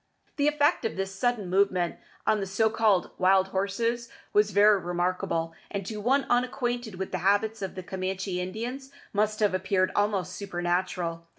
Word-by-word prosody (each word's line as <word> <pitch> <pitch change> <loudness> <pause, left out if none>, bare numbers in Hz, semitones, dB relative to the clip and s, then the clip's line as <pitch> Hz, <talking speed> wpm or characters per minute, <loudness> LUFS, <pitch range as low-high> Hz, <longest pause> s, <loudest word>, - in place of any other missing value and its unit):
The 285 0 +2
effect 295 +2 +2
of 225 - -2
this 195 0 -3
sudden 225 -1 0
movement 185 -2 +1 0.3
on 215 - +3
the 195 - -3
so 220 +3 +2
called 215 -5 +2
"wild 190 +1 +4
horses" 230 +5 -1 0.2
was 210 0 +4
very 205 +1 +5
remarkable, 175 -1 -1 0.2
and 200 -2 -4
to 210 +1 -5
one 270 +5 +2
unacquainted 245 -3 0
with 190 +1 -5
the - - -2
habits 205 +3 +1
of 195 - -4
the 185 - -6
Camanchee 190 0 -3
Indians 235 +9 -5 0.2
must 215 +1 0
have 205 -3 +3
appeared 185 0 +1
almost 200 -3 0
supernatural. 175 -3 -2
195 Hz, 165 wpm, -27 LUFS, 185-220 Hz, 0.3 s, very